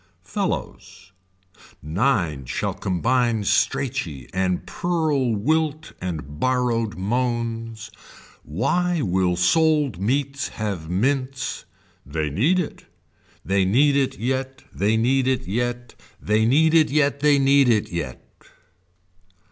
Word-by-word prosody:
fellows. 90 0 -5 0.7
Nine 85 - 0
shall - - -2
combine 115 +4 0
Straichy 100 - -1
and 95 -1 -1
purl 155 -9 0
wilt 155 +6 -1
and 80 -5 -5
borrowed 120 -5 0
moans. 115 +1 -2 0.5
Why 170 - 0
will 90 -2 +1
sold 145 - +2
meats 140 +4 -1
have 100 -7 -5
mints. 130 +7 -1 0.4
They 75 +2 -3
need 140 - +2
it. 180 -5 -4 0.6
They 95 0 +2
need 135 +10 +3
it 135 -1 0
yet. 130 +2 -3
They 105 +3 +1
need 130 +3 +2
it 130 -6 0
yet. 120 +3 -2 0.3
They 110 +1 +1
need 155 +6 +4
it 160 -2 +5
yet 140 -1 +1
they 145 0 +4
need 140 -1 +4
it 110 -3 +1
yet. 80 -7 -5
120 Hz, 110 wpm, -23 LUFS, 95-140 Hz, 0.7 s, it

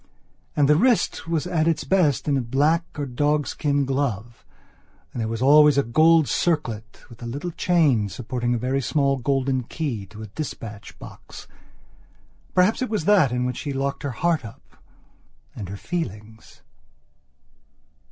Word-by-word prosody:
And 145 - +3
the 150 - +5
wrist 235 -1 +1
was 165 -4 -1
at 160 -1 0
its 160 -2 +1
best 155 - +1
in 145 - +2
a 135 - +1
black 145 +8 +1
or 145 - -2
a - - -4
dog 145 +3 0
skin 145 -2 0
glove 120 -5 -3 0.7
and 120 - -4
there 110 - -1
was 115 +2 -3
always 150 +1 +6
a 140 - +4
gold 155 +5 +4
circlet 115 - -2
with 120 -1 -15
a 120 - -6
little 145 +9 -4
chain 150 - +2
supporting 120 +1 -2
a - - 0
very 130 +4 -1
small 140 +2 +1
golden 135 0 0
key 120 -6 -4
to 110 +2 -10
a 105 -1 -11
dispatch 115 -9 -7
box. - - -12 1.1
Perhaps 185 +7 +3
it 255 - -1
was 210 -8 -2
that 190 - +4
in 125 0 -1
which 125 -1 -3
she 145 -2 -4
locked 135 +1 -3
up 140 - -2
her 120 - -8
heart 165 -5 +1 1.1
and 100 -4 -7
her 100 - -6
feelings. 110 - -6
140 Hz, 165 wpm, -23 LUFS, 120-155 Hz, 1.1 s, always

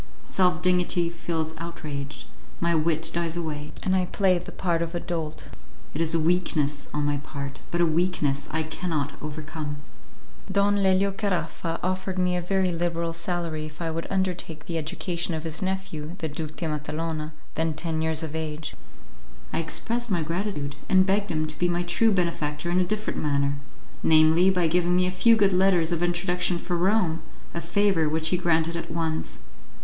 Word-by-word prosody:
Self 180 -3 +2
dignity 180 -1 +3
feels 165 -2 -2
outraged, 150 -4 -6 0.3
my 170 0 +2
wit 160 0 +2
dies 170 0 0
away, 150 -3 -4
and 190 - +2
I 185 -1 +2
play 190 -1 +3
the 175 - -9
part 170 -3 0
of 170 +1 -2
a - - 0
dolt. 160 -3 -4 0.4
It 155 - -1
is 165 0 +3
a - - +3
weakness 155 -4 +1
on 150 0 -1
my 145 0 +1
part, 140 -1 -6
but 175 - 0
a - - +6
weakness 160 -4 +1
I 160 +1 0
cannot 155 -3 -2
overcome. 155 0 -5 0.8
Don 200 +1 +3
Lelio 195 0 +3
Caraffa 175 -4 -2
offered 185 +1 -1
me 180 -1 +2
a 180 - 0
very 185 +1 +1
liberal 170 -1 -1
salary 170 -2 -2
if 150 0 -13
I 165 -1 -2
would 165 +1 -3
undertake 180 -5 -2
the 165 -1 -2
education 170 +2 -2
of 155 - -4
his 160 -1 -4
nephew, 185 -4 -3
the 160 - -2
Duke 155 +1 -5
de 170 - -3
Matalona, 155 +1 -3 0.2
then 160 -1 0
ten 160 0 0
years 160 0 +1
of 160 -1 -5
age. 155 -1 -4 0.8
I - - +1
expressed 235 +8 0
my 175 -5 +1
gratitude, 165 -4 -2
and 185 -1 +6
begged 200 +1 +1
him 155 -2 0
to 155 0 -5
be 175 - +2
my 175 0 +1
true 195 +6 +3
benefactor 170 -3 0
in 180 - +3
a - - +4
different 215 +4 -2
manner 140 -1 +1 0.4
namely, 160 +3 +6
by 180 -2 +2
giving 175 +2 +2
me 180 0 +4
a 180 - +1
few 225 +5 +5
good 200 -3 +4
letters 180 -3 +4
of 170 -1 0
introduction 175 0 +1
for 175 +1 -2
Rome, 175 -2 +2 0.3
a 170 - -3
favour 195 -7 +2
which 160 +1 +1
he 180 - +2
granted 170 -1 +2
at 170 - -4
once. 160 - -2
170 Hz, 185 wpm, -26 LUFS, 155-180 Hz, 0.8 s, a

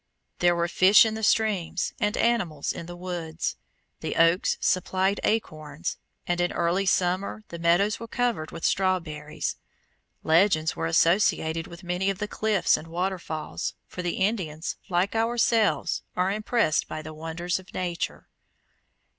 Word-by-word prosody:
There 175 0 +4
were 170 0 +1
fish 190 +5 +6
in 220 - -1
the 220 - -5
streams 205 -5 +1
and 210 +2 0
animals 180 -11 +1
in 170 - -7
the 175 - -7
woods. 175 -2 -4 0.4
The - - -4
oaks 165 +3 +3
supplied 190 +2 +1
acorns, 155 -7 -2 0.3
and 175 0 0
in 175 - +1
early 175 +3 +1
summer 185 +4 0
the 170 - -7
meadows 175 +5 +2
were 230 - -7
covered 235 -10 -1
with - - -6
strawberries. 165 -6 -1 0.7
Legends 160 -1 +3
were 80 0 -2
associated 165 - +2
with 170 +2 -12
many 180 +2 0
of 195 - -1
the 210 +1 -3
cliffs 215 -3 +2
and 160 - -9
waterfalls, 175 -2 -3
for 180 - -7
the 175 -1 -2
Indians, 180 -6 -1
like 180 +2 +1
ourselves, 225 -5 +2
are 185 +1 +1
impressed 215 -6 +1
by 155 - -6
the 155 +1 -8
wonders 165 +3 -3
of 190 - -15
Nature. 175 -2 -3
180 Hz, 145 wpm, -26 LUFS, 165-200 Hz, 0.7 s, fish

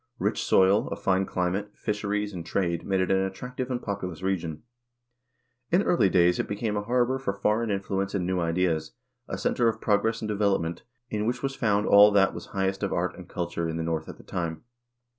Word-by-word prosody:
Rich - - -1
soil, 95 +3 +4
a - - -3
fine 95 0 +1
climate, 95 +3 -2
fisheries, 105 -1 -2
and 85 -2 -5
trade 85 -1 -1
made 95 -1 +2
it 95 - 0
an 95 0 +3
attractive 125 +7 -4
and 125 -1 -1
populous 95 -6 -5
region. 85 -4 -2 1.1
In 180 +4 +3
early 170 - +3
ages 90 -1 +3
it - - -1
became 105 +1 -2
a 105 - 0
harbor 125 +4 +1
for 100 -7 -2
foreign 105 +3 0
influence 100 0 -2
and 90 -3 0
new 90 0 0
ideas, 85 -2 0 0.3
a - - -4
center 120 - +1
of 115 - 0
progress 110 +2 +1
and 110 - -4
develop 100 -4 +1
ment, 80 +1 -5 0.3
in 105 0 -1
which 125 - -2
was 135 0 -1
found 105 -5 +1
all 100 +1 +8
that 95 -1 +4
was - - -8
highest 95 0 -1
of 100 - -1
art 90 +2 -1
and 90 -2 -12
culture 85 -1 -3
in 80 - -3
the 80 - -2
North 80 -1 -2
at - - -9
that - - -16
time. 80 -3 -4
95 Hz, 210 wpm, -27 LUFS, 90-105 Hz, 1.1 s, all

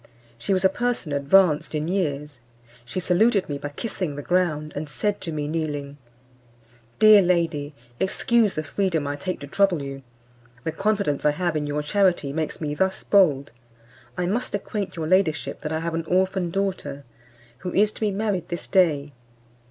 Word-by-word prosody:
She 120 - -3
was 190 0 +2
a - - +7
person 240 -8 -2
advanced 150 +2 +3
in 150 +1 -1
years; 150 -7 -2 0.5
she 125 +9 -4
saluted 195 +3 +2
me 145 -1 -4
by 145 - -5
kissing 180 -1 -4
the 145 - -6
ground, 155 -4 0
and 150 +1 -4
said 205 +6 -1
to 165 - -2
me 150 -2 -3
kneeling, 145 -3 -3 1.0
"Dear 215 -1 +8
lady, 165 -5 0 0.2
excuse 220 +2 +2
the 155 - -2
freedom 165 -4 -1
I 145 0 -2
take 185 +6 -4
to 140 - -7
trouble 185 -2 +2
you, 135 0 -6 0.6
the 160 - -1
confidence 200 -6 0
I 150 - +5
have 175 0 -1
in 150 -1 -1
your 145 +1 -2
charity 175 -4 +1
makes 155 0 -3
me 150 -2 -2
thus 190 +4 -1
bold. 150 - +3 0.7
I 180 - 0
must 210 +5 -1
acquaint 205 -1 -4
your 160 -2 -3
ladyship 175 -2 +1
that 150 - -4
I 160 0 -1
have 170 0 -3
an 165 0 -2
orphan 185 +1 +1
daughter, 175 -7 -3 0.6
who 180 - -5
is 210 +3 +3
to - - -13
be 215 - +2
married 200 -3 -2
this 170 -1 -4
day. 150 -7 +2
170 Hz, 175 wpm, -24 LUFS, 150-195 Hz, 1.0 s, Dear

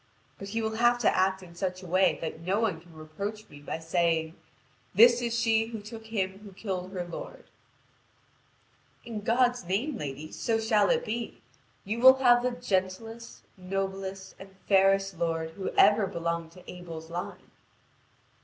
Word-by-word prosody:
But 195 - -7
he 225 +3 -2
will 220 0 -2
have 240 +1 +4
to - - +3
act 190 0 +1
in 170 -2 -13
such 185 +1 -4
a - - -9
way 185 +2 +3
that 160 -1 -5
no 185 +5 0
one 200 -8 -1
can 170 -1 -18
reproach 200 +8 -6
me 145 - -13
by 145 - -5
saying: 165 0 0 0.6
'This 235 +4 +7
is 235 -1 -1
she 225 -1 +2
who 225 -1 -6
took 220 +2 -10
him 195 -3 -2
who 205 -2 -12
killed 185 -2 -4
her 180 -2 -3
lord.'" 175 - -9 1.5
"In 225 -3 -5
God's 245 +2 +2
name, 220 - -2
lady, 145 +2 -6
so 225 -1 -1
shall 215 -2 +3
it - - +1
be. 230 +2 -5 0.4
You 215 +4 -2
will 260 +2 +9
have 245 -2 +5
the 250 - +1
gentlest, 225 0 -3
noblest, 190 +1 -4
and 195 0 -13
fairest 195 -2 +3
lord 165 -1 -1
who 190 +3 -4
ever 205 0 +5
belonged 170 -1 -3
to 180 - -16
Abel's 165 -2 -9
line." 175 +1 -6
195 Hz, 165 wpm, -28 LUFS, 175-225 Hz, 1.5 s, will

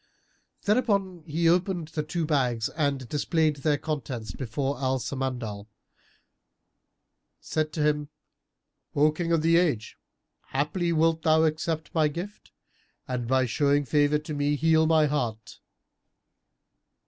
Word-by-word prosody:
Thereupon 200 -6 +1
he 165 +2 +1
opened 175 -1 +1
the 155 - -2
two 160 +2 -2
bags 125 -7 0
and, 140 -5 -1
displaying 155 +3 +1
their 145 +1 0
contents 130 -8 -4
before 135 +3 -3
Al 130 0 +1
Samandal, 120 -4 -4 1.7
said 155 -1 -2
to 155 - -1
him, 150 -1 +1 0.9
"O 150 +2 +4
King 170 +2 -3
of 165 -2 +2
the 165 +1 +4
Age, 150 -11 0 0.5
haply 160 +6 -1
wilt 165 0 +2
thou 160 0 +4
accept 155 0 -1
my 155 -2 +3
gift 175 - -7 0.6
and 125 -2 -3
by 130 +1 +3
showing 145 +3 +1
favour 145 +1 +3
to 150 +1 -6
me 145 0 +1
heal 160 +1 +3
my 160 -1 +4
heart." 120 -7 -3
150 Hz, 125 wpm, -27 LUFS, 135-160 Hz, 1.7 s, O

